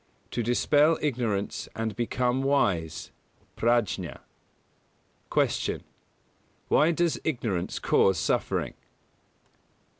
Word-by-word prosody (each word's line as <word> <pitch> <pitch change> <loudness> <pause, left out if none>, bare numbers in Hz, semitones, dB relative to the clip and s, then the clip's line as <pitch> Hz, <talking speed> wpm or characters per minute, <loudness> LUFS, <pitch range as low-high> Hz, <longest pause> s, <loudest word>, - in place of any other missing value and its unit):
To 120 - -1
dispel 145 +7 +3
Ignorance 115 -8 -2
and 110 -1 -2
become 125 +2 0
wise 95 - 0 0.4
(Prājña). 105 - 0 1.1
118. - - +1
Q. - - -28 0.9
_Why 160 +3 +4
does 170 -1 +1
ignorance 115 - -2
cause 95 -2 +3
suffering? - - 0
120 Hz, 85 wpm, -27 LUFS, 100-140 Hz, 1.1 s, Why